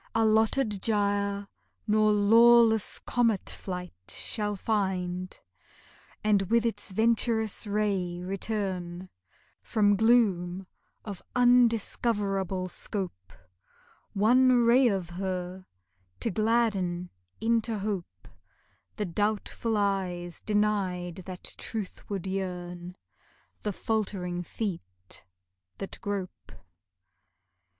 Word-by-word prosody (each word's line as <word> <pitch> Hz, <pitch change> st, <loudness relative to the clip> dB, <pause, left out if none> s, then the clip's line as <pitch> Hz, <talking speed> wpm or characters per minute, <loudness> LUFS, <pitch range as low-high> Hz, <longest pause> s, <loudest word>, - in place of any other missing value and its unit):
Allotted 220 Hz, 0 st, +2 dB
gyre 200 Hz, -1 st, 0 dB, 0.4 s
nor 215 Hz, 0 st, +3 dB
lawless 225 Hz, +1 st, +5 dB
comet 230 Hz, -5 st, 0 dB
flight 180 Hz, -1 st, -6 dB, 0.2 s
Shall 210 Hz, -2 st, -1 dB
find, 185 Hz, -3 st, -2 dB, 0.8 s
and 210 Hz, -2 st, +3 dB
with 235 Hz, 0 st, +3 dB
its 230 Hz, -, -1 dB
venturous 220 Hz, +1 st, +1 dB
ray 200 Hz, -4 st, 0 dB
return 185 Hz, -2 st, -3 dB, 0.5 s
From 205 Hz, -2 st, +2 dB
gloom 195 Hz, -5 st, +2 dB, 0.4 s
of 200 Hz, -4 st, -6 dB
undiscoverable 220 Hz, -6 st, +2 dB
scope, 175 Hz, -, -5 dB, 0.8 s
One 245 Hz, +4 st, +5 dB
ray 245 Hz, +2 st, +6 dB
of 190 Hz, -5 st, -1 dB
her 185 Hz, 0 st, -4 dB, 0.5 s
to 230 Hz, -, 0 dB
gladden 200 Hz, -5 st, 0 dB, 0.3 s
into 225 Hz, 0 st, +1 dB
hope 200 Hz, -3 st, -5 dB, 0.7 s
The 210 Hz, -, -2 dB
doubtful 210 Hz, +4 st, -1 dB
eyes 185 Hz, -4 st, -1 dB
denied 200 Hz, -4 st, 0 dB
that 185 Hz, -1 st, -7 dB, 0.2 s
truthward 200 Hz, -3 st, -5 dB
yearn, 180 Hz, -2 st, -4 dB, 0.7 s
The 210 Hz, -, -2 dB
faltering 190 Hz, -4 st, -2 dB
feet 95 Hz, -, -6 dB, 0.5 s
that 195 Hz, -, -7 dB
grope. 200 Hz, -3 st, -5 dB
200 Hz, 85 wpm, -28 LUFS, 185-220 Hz, 0.8 s, ray